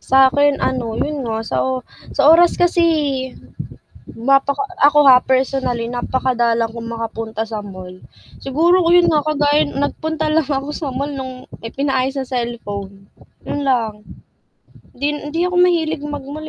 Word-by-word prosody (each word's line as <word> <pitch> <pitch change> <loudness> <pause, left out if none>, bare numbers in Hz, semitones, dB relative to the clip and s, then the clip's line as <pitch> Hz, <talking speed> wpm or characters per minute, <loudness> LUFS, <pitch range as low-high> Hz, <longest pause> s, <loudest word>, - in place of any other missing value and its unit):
Sa 265 0 +5
akin 285 +1 +2
ano, 235 -4 -2
yun 295 -2 -2
nga 225 -2 -3
sa - - -1
o 260 0 -1 0.3
sa 280 0 +2
oras 340 +2 +5
kasi 350 -1 +3 1.3
mapaka 275 +3 +2 0.2
ako 295 0 +6
ha 250 -1 +7
personally 260 -2 0
napakadalang 240 -2 0
kong 230 0 -7
makapunta 225 -1 -4
sa 215 -1 -5
mall. 185 -2 -9 0.5
Siguro 335 +7 +2
yun 350 0 +5
nga 305 -1 +2
kagaya 295 0 +2
nagpunta 315 +2 -2
lang 320 -1 +2
ako 275 0 -2
sa 295 - -4
mall 280 +3 -3
nung 260 -1 -7 0.3
pinaayos 270 -1 0
ng 265 - -5
cellphone, 205 -5 -5 0.4
yun 290 - -3
lang. 240 -5 +1 1.0
Hindi 285 +4 -2 0.2
hindi 330 - -1
ako 360 - -5
mahilig 330 -4 +2
mag-mall 290 +2 -7
270 Hz, 140 wpm, -18 LUFS, 235-295 Hz, 1.3 s, ha